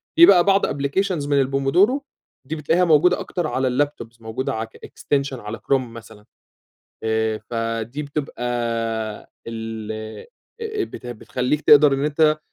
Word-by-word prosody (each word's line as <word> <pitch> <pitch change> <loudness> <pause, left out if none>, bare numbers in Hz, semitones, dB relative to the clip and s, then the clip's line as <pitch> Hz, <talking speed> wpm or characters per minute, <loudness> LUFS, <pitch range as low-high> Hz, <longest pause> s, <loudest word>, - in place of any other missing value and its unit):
في 340 +1 +9
بقى 180 - +7
بعض 195 +1 +3
applications 145 +3 -1
من 140 -2 +3
الpomodoro، 175 - +3 0.5
دي 160 - -3
بتلاقيها 165 +4 +2
موجودة 175 +2 +4
أكتر 175 -4 -3
على 130 -3 0
الlaptops 125 -4 -2
موجودة 110 +4 -3
ع 110 0 -3
الextension 140 +4 -3
على 105 +1 -6
كروم 130 -3 -1
مثلًا، 110 -2 -13 0.8
آآ، 110 0 0
فدي 115 +4 -3
بتبقى 145 -3 -5 1.0
ال 110 -1 -5 0.7
آآ، 435 -3 -2
بت - - -9
بتخليك 125 +5 -2
تقدر 150 -1 +7
إن 135 +1 0
أنت 155 +1 +2
140 Hz, 135 wpm, -22 LUFS, 115-155 Hz, 1.0 s, في